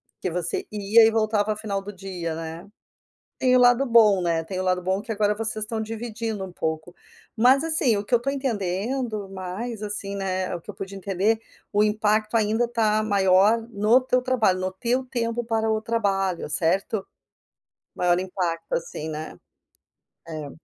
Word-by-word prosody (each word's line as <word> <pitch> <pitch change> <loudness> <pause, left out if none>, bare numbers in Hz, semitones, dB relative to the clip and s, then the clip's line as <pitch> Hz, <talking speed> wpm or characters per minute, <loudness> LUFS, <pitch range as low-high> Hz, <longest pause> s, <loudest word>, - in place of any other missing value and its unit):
porque 185 - -3
você 175 0 -3
ia 215 +2 +5
e 225 - +4
voltava 215 -1 +1
final 200 -2 -3
do 205 +1 -8
dia, 180 -4 -5
né. 165 +3 -7 0.7
Tem 255 -1 +4
o - - +4
lado 245 +2 +5
bom, 215 -6 +5
né, 165 -2 +1
tem 185 +2 -6
o - - -1
lado 185 0 +1
bom 190 +2 -1
que 225 - -6
agora 210 -1 +2
vocês 220 -1 -3
estão 220 0 -3
dividindo 220 -2 -4
um 185 - -10
pouco. 160 +2 -4 0.4
Mas, 255 +5 +5
assim, 305 -9 +2
o 200 - -4
que 245 - -6
eu - - +8
estou 275 +3 -1
entendendo 220 -2 -2
mais, 195 +5 -5
assim, 205 -1 -4
né, 185 -2 -2
o 170 - -7
que - - -18
eu - - -4
pude 195 0 -7
entender, 200 +3 0 0.3
o 205 +1 +4
impacto 215 +1 +1
ainda 220 +2 +2
está 220 -2 +1
maior 200 +1 +4
no 215 +3 +4
teu 255 0 +1
trabalho, 225 -8 +2
no 185 0 -2
teu 240 +7 -1
tempo 240 -2 -2
para 225 -1 0
o 220 0 +1
trabalho, 195 -7 0
certo? 190 +6 0 0.9
Maior 175 0 +2
impacto, 180 -3 -3
assim, 160 -1 -3
né. 155 0 -6 0.9
É. 155 -3 -6
210 Hz, 175 wpm, -24 LUFS, 185-230 Hz, 0.9 s, eu